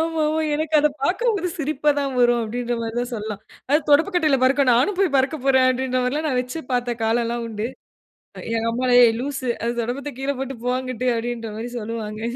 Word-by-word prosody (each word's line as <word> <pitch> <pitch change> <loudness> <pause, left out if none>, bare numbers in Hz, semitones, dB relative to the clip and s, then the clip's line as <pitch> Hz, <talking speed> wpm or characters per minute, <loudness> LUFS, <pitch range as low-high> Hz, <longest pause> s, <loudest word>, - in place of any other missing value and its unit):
ஆமாமா. 320 -1 0
எனக்கு 310 +1 -2
அத 300 - +4 0.2
பார்க்கும்போதே 405 - +1
சிரிப்பா 300 -1 +1
தான் 275 -1 -2
வரும். 240 0 +4
அப்படிங்கிற 240 +2 -3
மாரி 225 0 -4
தான் 245 +1 -4
சொல்லலாம். 210 -1 -5 0.3
அதாவது 295 +2 +1
தொடப்பக்கட்டையில 315 -2 +3
பறக்கும். 265 0 +3
நானும் 360 - +1
போய் 360 -8 +2
பறக்க 270 +3 +1
போறேன் 260 -1 +5
அப்படின்ற 255 0 -1
மாரியெல்லாம் 295 +5 -1
நான் 255 - 0
வெச்சு 250 +6 -5
பார்த்த 245 -1 0
காலல்லாம் 235 +1 0
உண்டு. 215 0 -3 0.7
அ - - -7 0.2
எங்க 225 0 -1
அம்மா"ஏய்! 245 -1 +5
லூசு 275 -1 -4 0.2
அது 235 +1 0
தொடப்பத்த 270 +5 -4
கீழ 270 +1 -3
போட்டு 270 0 -4
போ, - - +1
அங்குட்டு" 255 -1 -4
அப்படீன்ற 230 -1 -4
மாரி 230 +2 -4
சொல்லுவாங்க. 215 -1 -5
255 Hz, 185 wpm, -22 LUFS, 235-295 Hz, 0.7 s, போறேன்